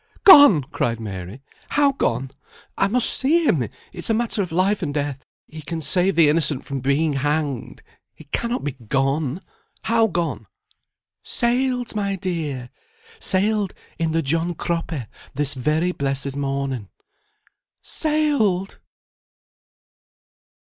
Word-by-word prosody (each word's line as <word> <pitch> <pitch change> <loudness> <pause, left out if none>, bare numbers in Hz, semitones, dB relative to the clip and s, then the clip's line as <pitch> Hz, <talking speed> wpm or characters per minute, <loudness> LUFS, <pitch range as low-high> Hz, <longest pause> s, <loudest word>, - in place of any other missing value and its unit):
"Gone!" 290 - +9
cried 120 -4 -2
Mary. 100 +3 -7 0.3
"How 285 -1 +3
gone? 135 - -1 0.4
I 195 - +2
must 235 +4 +2
see 320 +5 +2
him, 135 - +2 0.3
it's 175 - -4
a 225 - +3
matter 225 -2 0
of 180 -4 -4
life 190 +5 +1
and 155 -5 -2
death: 145 -2 -3 0.2
he 155 0 -10
can 160 +3 -5
save 180 +5 +1
the 165 -2 +6
innocent 150 -2 +1
from 140 -1 -4
being 140 +4 +1
hanged, 145 -2 -2 0.3
he - - -14
cannot 235 - -2
be 145 - -1
gone, 135 - -1 0.4
how 225 0 +3
gone?" 165 - -3 0.7
"Sailed, 245 -1 -1
my 200 -2 -1
dear! 160 -9 -4 0.5
sailed 205 - 0 0.2
in 165 -1 0
the 165 0 0
John 165 +4 0
Cropper 165 -7 -3 0.3
this 145 0 0
very 155 +7 0
blessed 140 -3 -2
morning." 135 -6 -3 0.9
"Sailed!" 285 - 0
160 Hz, 125 wpm, -22 LUFS, 140-200 Hz, 0.9 s, Gone